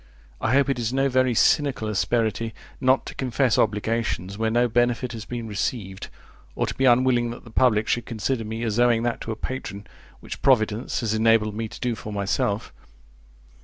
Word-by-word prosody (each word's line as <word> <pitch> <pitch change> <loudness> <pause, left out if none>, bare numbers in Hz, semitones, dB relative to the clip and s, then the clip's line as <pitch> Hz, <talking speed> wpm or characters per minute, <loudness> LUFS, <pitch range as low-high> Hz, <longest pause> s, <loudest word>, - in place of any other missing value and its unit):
I 115 - +1
hope 140 +1 +4
it 135 -3 -1
is 115 -1 -1
no 135 +1 +1
very 130 -1 +2
cynical 140 -4 +2
asperity 110 0 0 0.2
not 130 0 +3
to - - -7
confess 130 -2 +1
obligations 105 -3 -1
where 110 +1 0
no 120 +2 +2
benefit 120 +1 +1
has 110 -2 -7
been 120 -2 -5
received, 100 -2 -3 0.5
or - - 0
to - - -4
be 135 - 0
unwilling 120 -1 +4
that 120 - -8
the 115 - -13
public 110 -3 +3
should 120 -1 -1
consider 115 +2 -2
me 110 +2 -5
as 110 0 -1
owing 120 -2 +3
that 120 -1 -1
to 115 - -4
a - - -3
patron, 105 -4 -6 0.3
which - - -8
providence 115 -3 +2
has 110 -2 -1
enabled 110 -1 +3
me 110 +1 -3
to - - -11
do 125 -1 -1
for 110 -1 -7
myself. 100 +1 -1
115 Hz, 190 wpm, -24 LUFS, 110-125 Hz, 0.5 s, hope